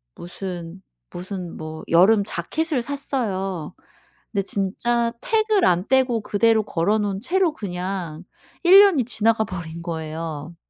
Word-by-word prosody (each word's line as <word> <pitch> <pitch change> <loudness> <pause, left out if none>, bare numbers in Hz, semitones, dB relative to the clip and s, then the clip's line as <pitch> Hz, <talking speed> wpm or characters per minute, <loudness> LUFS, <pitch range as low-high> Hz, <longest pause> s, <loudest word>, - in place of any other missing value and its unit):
무슨, 175 0 -7 0.3
무슨 180 -1 -7
뭐 155 0 -7
여름 200 +5 +5
재킷을 275 - -2
샀어요. 195 - -3 0.6
근데 200 -2 0
진짜 230 +5 0
태그를 435 -4 +2
안 180 +2 +1
떼고 255 -4 +2
그대로 220 +1 +2
걸어 195 +4 0
놓은 200 -2 -2
채로 350 +3 +1
그냥 180 - -5 0.4
1 370 +3 +9
년이 370 - +5
지나가 225 -1 +2
버린 170 -2 -7
거예요. 160 -1 -5
195 Hz, 245 characters per minute, -22 LUFS, 175-240 Hz, 0.6 s, 1